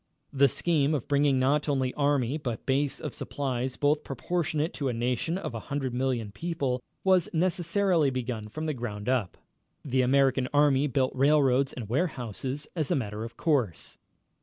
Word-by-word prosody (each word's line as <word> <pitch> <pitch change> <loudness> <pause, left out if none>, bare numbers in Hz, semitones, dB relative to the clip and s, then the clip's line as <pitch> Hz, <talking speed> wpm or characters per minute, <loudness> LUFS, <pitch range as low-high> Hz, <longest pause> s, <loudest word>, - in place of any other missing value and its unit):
The 140 0 +5
scheme 150 +1 +1
of 135 - -4
bringing 140 -1 +3
not 140 +4 +2
only 130 -3 0
army 140 -3 +1
but 120 -6 -4
base 140 +1 0
of - - -5
supplies, 130 -2 -3
both 145 +1 +2
proportionate 155 +3 -2
to 140 - -3
a - - -1
nation 125 +8 -1
of 190 - -5
a 115 - -4
hundred 135 -3 -2
million 125 -4 -1
people, 135 -1 -2 0.2
was 185 -3 +3
necessarily 175 -1 +2
begun 125 -4 -3
from 155 +8 -5
the 155 - -1
ground 110 -4 -5
up. 125 -9 0 0.5
The 130 -2 +2
American 130 0 +3
Army 145 -1 +4
built 130 -1 +1
railroads 135 -1 +3
and 120 -4 -7
warehouses 130 - -2
as 155 -5 -1
a 175 - +2
matter 110 -5 -3
of 115 - -8
course. 130 - -1
135 Hz, 165 wpm, -28 LUFS, 125-150 Hz, 0.5 s, The